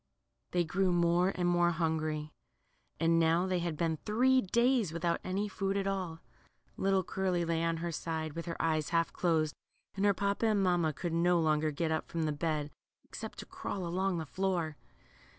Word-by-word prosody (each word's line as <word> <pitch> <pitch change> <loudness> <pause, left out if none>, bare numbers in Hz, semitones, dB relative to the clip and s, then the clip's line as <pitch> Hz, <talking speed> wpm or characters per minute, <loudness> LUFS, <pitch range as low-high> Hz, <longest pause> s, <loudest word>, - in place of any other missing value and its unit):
They 175 -1 +1
grew 185 +3 +1
more 175 +1 +3
and 175 -1 +1
naore 175 0 +3
hungry, 155 -2 -1 0.7
and 165 0 +3
now 165 +2 +3
they 185 -1 0
had 170 -3 -2
been 165 -1 0
three 255 - +3
days 235 -2 +2
without 170 +1 -1
any 195 +3 -1
food 195 0 -2
at 195 - -1
all. 185 -5 -3 0.5
Little 195 -1 +2
Curly 180 -2 -1
lay 165 0 0
on 165 0 0
her 170 +1 -3
side, 160 -1 -3
with 165 +2 -6
her 165 - -4
eyes 155 -2 +1
half 165 -1 +1
closed, 160 -3 +1 0.4
and 195 - -2
her 200 -1 +4
papa 200 +3 0
and 210 -2 +2
mamma 175 -4 +2
could 170 +2 -4
no 175 +1 +3
longer 155 -1 +2
get 160 +2 -1
up 160 - -1
from 165 -1 -2
the 155 - 0
bed, 150 -1 -2 0.3
except - - -8
to - - -7
crawl 190 -3 -5
along 185 +2 0
the 160 - -3
floor. 175 -2 -1
170 Hz, 185 wpm, -32 LUFS, 160-190 Hz, 0.7 s, her